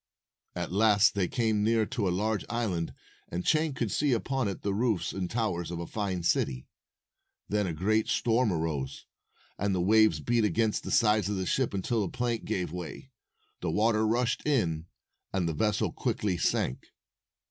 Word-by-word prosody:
At - - -3
last 105 +1 +4
they 95 -3 0
came 110 -3 +1
near 110 0 +3
to 115 -3 -2
a - - +2
large 105 +3 0
island, 100 -9 -2 0.3
and 90 +1 -4
Chang 155 -2 +2
could 115 -5 -2
see 145 -3 +2
upon 130 +1 0
it 100 - -5
the 100 - 0
roofs 105 -5 0
and 95 -2 -3
towers 90 -8 -1
of 85 - -4
a 85 - -4
fine 95 -3 -3
city. 65 -6 0 0.8
Then 105 -1 +1
a 85 - -2
great 105 +7 +1
storm 115 -1 +2
arose, 75 -5 -3 0.5
and 100 -1 +1
the - - 0
waves 105 -2 +4
beat 115 +8 +1
against 105 +2 +1
the - - -5
sides 105 -3 +3
of 105 - -1
the 95 -1 -2
ship 130 +6 +1
until 105 +3 0
a 95 - -3
plank 120 -2 -2
gave 90 -7 -2
way. 90 -1 -7 0.5
The - - -2
water 110 0 +2
rushed 120 +2 +1
in, 85 - 0 0.4
and 95 -3 0
the 80 - -1
vessel 105 +6 0
quickly 100 -4 -1
sank. 65 -5 -1
105 Hz, 180 wpm, -29 LUFS, 90-115 Hz, 0.8 s, last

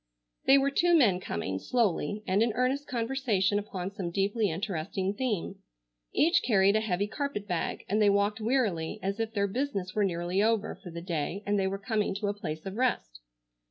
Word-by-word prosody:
They 270 - +7
were 275 0 +2
two 345 +4 +4
men 205 - +4
coming, 95 - -3
slowly, 210 - 0
and 190 +3 +2
in 230 -1 +2
earnest 255 +5 0
conversation 230 -5 0
upon 195 -2 -5
some 190 -3 -4
deeply 200 +4 +1
interesting 190 +2 -2
theme. 205 -5 -2 0.5
Each 335 +3 +3
carried 200 -3 +3
a - - +4
heavy 200 -2 0
carpet 210 -3 -4
bag, 175 -4 -2
and 210 +3 +1
they 205 - +6
walked 200 +2 +1
wearily, 215 -9 0
as 195 +3 -2
if 225 -1 -1
their 200 0 +2
business 200 -4 -2
were 210 - +1
nearly 175 0 0
over 220 -1 +1
for 180 - -11
the 170 0 -7
day 175 +3 -3
and 205 0 +1
they 190 - +1
were 195 +1 -2
coming 205 0 -1
to 205 0 -1
a - - 0
place 155 -6 -6
of 195 +2 -5
rest. - - -1
205 Hz, 195 wpm, -29 LUFS, 185-225 Hz, 0.5 s, They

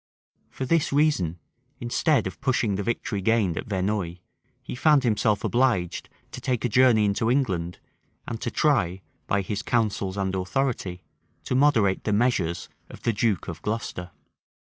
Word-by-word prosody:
[*] - - -44
For 130 - -5
this 165 +2 +1
reason, 140 - +2 0.4
instead 125 +2 +1
of 95 -3 -6
pushing 120 -5 +1
the 100 - -2
victory 105 -1 -2
gained 105 -4 +2
at - - -5
Verneuil, 95 -3 -1 0.5
he - - -7
found 145 +2 +4
himself 105 -3 +1
obliged 120 -9 0 0.2
to - - -8
take 125 -3 -1
a - - +1
journey 120 -2 +5
into 105 +3 +1
England, 95 -10 0 0.5
and 115 - -5
to - - -1
try, 95 - +1 0.3
by 100 - +1
his 100 +1 -3
counsels 105 -4 -1
and 95 -1 -1
authority, 95 -2 -2 0.4
to - - -3
moderate 115 -8 +3
the 105 - 0
measures 100 -7 +1 0.2
of - - -12
the 115 - +1
duke 105 -5 0
of 85 -1 -6
Glocester. 105 -5 -4
110 Hz, 160 wpm, -25 LUFS, 95-125 Hz, 0.5 s, journey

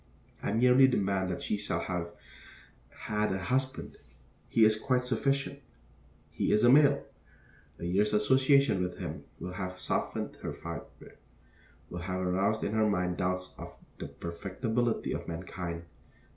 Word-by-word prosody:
I - - -1
merely 125 +4 +6
demand 100 -6 0
that 90 - -3
she 105 - 0
shall 105 - -1
have 90 -2 -3 0.8
had 105 -1 -2
a 95 - 0
husband. 130 +8 -2 0.5
He 115 - +5
is 110 0 +3
quite 125 0 +1
sufficient. 135 +3 0 0.7
He - - 0
is 105 - +3
a 120 - +7
male. 145 +1 +5 0.7
A - - -6
year's 100 +4 +2
association 130 +1 +4
with 90 0 -3
him 80 -5 -6
will 90 0 -6
have 90 0 -5
softened - - -2
her - - -5
fibre, 85 -2 -9 0.7
will 90 - -4
have 90 +1 -3
aroused 95 +4 +1
in - - -1
her 110 -1 +3
mind 90 -3 0
doubts 90 0 -2
of - - -9 0.2
the - - -5
perfectibility 110 +7 -2
of - - -5
mankind. 85 0 -5
100 Hz, 145 wpm, -30 LUFS, 90-120 Hz, 0.8 s, a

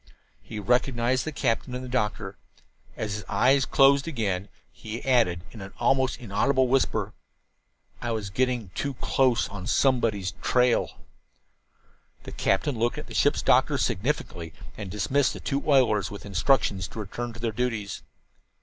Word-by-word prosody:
He - - -9
recognized 125 +3 +1
the 155 - -3
captain 125 -2 -1
and 125 - -5
the - - -6
doctor. 105 -5 -2 0.6
As 105 -2 -3
his 105 0 -5
eyes 135 +1 +3
closed 140 +2 +4
again 105 - -2 0.2
he 110 +1 -7
added, 115 -10 +2
in 110 - -10
an 95 0 -9
almost 130 -2 +1
inaudible 130 +5 +1
whisper: 135 +1 +1 0.9
"I 120 - -3
was 110 -4 -3
getting 125 -2 0
too 140 +9 -4
close 125 -1 +1
on 100 -1 -7
somebody's 115 -8 +1
trail." 125 -1 +2 1.3
The - - -8
captain 115 +6 0
looked 120 +1 0
at - - -6
the - - -11
ship's - - +2
doctor - - +3
significantly 95 - -2 0.2
and 100 - -7
dismissed 130 +8 +1
the - - -8
two 140 -1 -2
oilers 125 -7 +3
with 100 - -9
instructions 100 -2 +1
to - - -9
return 120 +4 -5
to 115 - -11
their 115 -1 -1
duties. 110 -3 -3
120 Hz, 150 wpm, -26 LUFS, 105-130 Hz, 1.3 s, closed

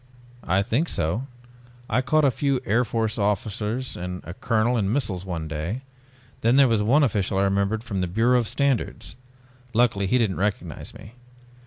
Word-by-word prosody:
"I 95 +3 +3
think 140 +11 0
so, 105 - -1 0.6
I 120 +3 +1
caught 155 +3 +3
a 135 - +4
few 135 +2 0
Air 115 +5 +3
Force 115 -1 -2
officers 105 +4 -1
and 90 0 -5
a 85 - -7
colonel 115 +4 +1
in 100 -4 +1
missiles 100 -8 -1
one 80 -4 -3
day. 80 - -4 0.6
Then 115 +3 +3
there 135 -1 +7
was 115 -3 +2
one 130 +8 +4
official 100 -6 0
I 95 - +3
remembered 100 +3 +1
from 100 -6 -3
the 90 - 0
Bureau 115 +7 +3
of 115 - -1
Standards. 140 0 -1 0.6
Luckily 110 -5 +3
he 125 - +3
didn't 110 -6 +1
recognize 95 -5 -3
me. 110 +1 -12
110 Hz, 175 wpm, -24 LUFS, 95-125 Hz, 0.6 s, there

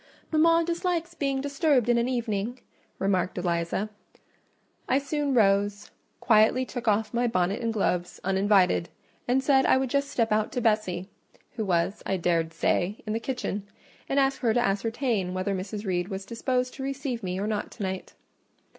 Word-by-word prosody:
"Mama 330 +1 +4
dislikes 345 0 -1
being 275 -4 -1
disturbed 280 -3 +2
in 240 -1 +4
an 235 +2 0
evening," 235 -1 -2 0.4
remarked 185 -2 0
Eliza. 175 +3 -1 1.0
I 265 - +4
soon 280 0 -1
rose, 205 -1 +2 0.3
quietly 225 +3 +4
took 245 -2 -6
off 215 0 +2
my 240 +1 +2
bonnet 185 -1 0
and 230 -1 0
gloves, 180 -5 -1
uninvited, 190 -2 +3 0.4
and 260 +2 +2
said 265 -1 +4
I - - +5
would 260 -2 -1
just 280 0 +1
step 230 -5 0
out 215 0 +1
to - - 0
Bessie—who 215 0 -3
was, 185 +1 0
I 190 - -1
dared 165 -2 +1
say, 175 +4 0
in 215 - -2
the 225 - 0
kitchen—and 230 +2 -4
ask 270 -1 +2
her 230 -3 +1
to - - +4
ascertain 205 -1 -1
whether 185 +2 -1
Mrs. 200 +3 -5
Reed 175 -2 -1
was 195 -1 -5
disposed 250 +2 -1
to 270 - -7
receive 270 -3 -3
me 185 -1 -3
or 200 - -1
not 210 -1 -2
to - - -6
night. 190 -1 -4
220 Hz, 165 wpm, -27 LUFS, 195-260 Hz, 1.0 s, I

